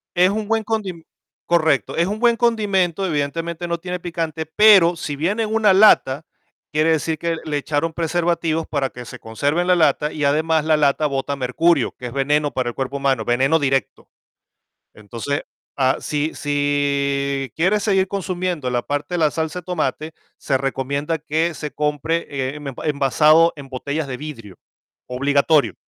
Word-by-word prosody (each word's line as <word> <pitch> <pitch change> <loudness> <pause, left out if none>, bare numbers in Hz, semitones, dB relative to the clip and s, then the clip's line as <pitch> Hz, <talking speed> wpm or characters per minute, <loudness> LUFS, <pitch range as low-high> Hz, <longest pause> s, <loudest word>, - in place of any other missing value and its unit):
Es 180 +1 +5
un 210 +1 -3
buen 225 0 +1
condi 200 -7 -3 0.4
correcto, 165 -2 +1
es 170 +2 +2
un 210 +2 -3
buen 235 0 +4
condimento, 200 -6 +1
evidentemente 165 +2 -2
no 170 0 -2
tiene 180 +1 -5
picante, 165 -2 -4
pero 185 -1 +6
si 150 -3 -5
viene 190 +10 0
en 215 0 -3
una 215 -3 +4
lata 165 -8 +5 0.5
quiere 155 +2 +2
decir 160 0 0
que 170 0 -1
le 150 -1 -1
echaron 155 +2 -2
preservativos 165 -1 -1
para 140 -3 -1
que 125 -1 -10
se - - -10
conserve 145 +9 -1
en 180 - -2
la 180 - +5
lata 150 -2 +2
y 150 - -4
además 155 +2 +2
la 155 -1 +3
lata 145 +1 +2
bota 140 0 -2
mercurio, 140 +3 +1
que 125 - -6
es 120 - -8
veneno 145 +2 +1
para 125 -2 -2
el 120 - -8
cuerpo 135 +1 -3
humano, 135 -5 0
veneno 135 +7 +2
directo. 135 -1 -1 0.9
Entonces 115 +7 -4 0.3
ah, 130 -1 +2
si 150 +1 -2
si 140 -2 -1
quieres 190 +6 +2
seguir 190 -3 +2
consumiendo 180 -6 -3
la 120 -1 0
parte 145 +6 -3
de - - 0
la 155 -2 +3
salsa 160 +3 -3
de - - -26
tomate, 160 -2 -2 0.3
se 135 -2 0
recomienda 140 +4 -2
que 160 +3 -1
se 150 -1 -6
compre, 150 +3 -1 0.3
eh, - - -9
me 140 -2 -6
puede 150 - -2
envasado 150 +4 +4
en 140 -2 -10
botellas 140 +3 -4
de 125 - -4
vidrio, 115 -10 -9 0.5
obligatorio, 140 +3 +2
155 Hz, 175 wpm, -20 LUFS, 140-170 Hz, 0.9 s, pero